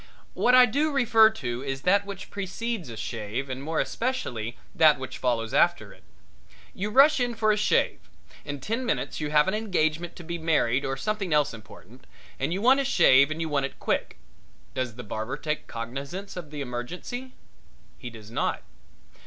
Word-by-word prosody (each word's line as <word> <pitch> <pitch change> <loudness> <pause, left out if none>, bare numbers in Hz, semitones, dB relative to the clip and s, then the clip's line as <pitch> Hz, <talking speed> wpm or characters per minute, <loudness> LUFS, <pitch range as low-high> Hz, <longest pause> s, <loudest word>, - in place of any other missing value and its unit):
What 250 +1 +4
I 255 0 +9
do 290 +6 0
refer 225 -5 +5
to 125 - -5
is 135 0 -4
that 200 +2 +3
which 200 -2 -8
precedes 200 - -4
a 115 - -8
shave 115 +4 -4
and 130 +1 -5
more 155 +3 -2
especially 135 - -2 0.2
that 155 -2 +5
which 130 0 -7
follows 115 -3 -1
after - - +2
it. - - -21 0.7
You 205 +3 -3
rush 280 +6 +6
in 245 -1 0
for 215 -1 +2
a - - +3
shave. 210 - +1 0.4
In 145 0 -5
ten 225 - -2
minutes 235 - -2
you 150 -1 -2
have 150 +2 +4
an 190 - +1
engagement 175 -6 -1
to 175 - -10
be 170 +1 -5
married 145 -6 +1
or 135 0 -2
something 195 +3 -2
else 150 -3 +2
important, 115 +2 -14 0.3
and 135 +4 -1
you 190 +4 -2
want 260 +3 +6
a - - +2
shave 140 - +5
and 155 +1 -4
you 165 - -1
want 140 -3 0
it - - -17
quick. - - -2 0.6
Does 125 -4 -3
the 125 - -8
barber 110 +2 -4
take 155 -1 -3
cognizance 140 +12 -6
of 175 -5 -7
the 150 -1 -6
emergency? 175 - -6 0.6
He 120 - -7
does 110 -2 -12
not. - - -1
155 Hz, 185 wpm, -26 LUFS, 130-215 Hz, 0.7 s, I